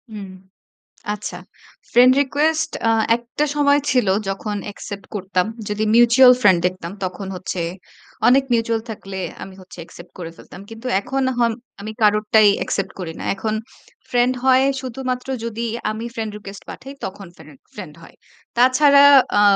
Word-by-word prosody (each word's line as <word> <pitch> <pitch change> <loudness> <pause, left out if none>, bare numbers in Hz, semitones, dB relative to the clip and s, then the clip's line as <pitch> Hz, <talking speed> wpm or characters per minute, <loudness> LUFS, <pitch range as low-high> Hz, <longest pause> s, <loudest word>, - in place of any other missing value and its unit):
উম 195 -2 -7 0.8
আচ্ছা। 195 -3 -6 0.5
Friend 250 +2 +7
request 310 +3 0 0.2
আ - - +4 0.3
একটা 240 +5 -3
সময় 290 0 +3
ছিল 250 -5 +2 0.2
যখন 205 +2 -3
অ্যাকসেপ্ট 200 -1 -8
করতাম। 185 -1 -1 0.2
যদি 210 +1 -1
মিউচুয়াল 240 +2 +7
ফ্রেন্ড 190 -6 +5
দেখতাম 180 -1 -5
তখন 190 +2 -5
হচ্ছে 180 -1 -5 0.7
অনেক 270 +2 +5
মিউচুয়াল 230 -1 +1
থাকলে 195 -2 -7 0.2
আমি 190 - -9
হচ্ছে 185 -1 -15
অ্যাকসেপ্ট 175 +1 -13
করে 165 -2 -6
ফেলতাম। 180 - -13
কিন্তু 225 +3 -10
এখন 270 +6 -3 0.2
হম 235 -1 +2 0.3
আমি 215 +2 -6
কারোরটাই 210 0 +4
অ্যাকসেপ্ট 195 - -3
করি 165 -2 -5
না। - - -6
এখন 215 +2 -3 0.6
ফ্রেন্ড 245 +1 +2
হয় 260 0 +5 0.2
শুধুমাত্র 255 0 -5 0.2
যদি 230 0 -4 0.3
আমি 220 +2 -5
ফ্রেন্ড 220 -2 -4
রিকোয়েস্ট 200 -1 -10
পাঠাই 275 +2 -10
তখন 195 0 -7
ফ্রেন্ড, 155 -3 -15 0.2
ফ্রেন্ড 150 - -9
হয়। - - -15 0.4
তাছাড়া 280 +3 +5 0.4
আ - - +5
220 Hz, 145 wpm, -20 LUFS, 195-255 Hz, 0.8 s, ফ্রেন্ড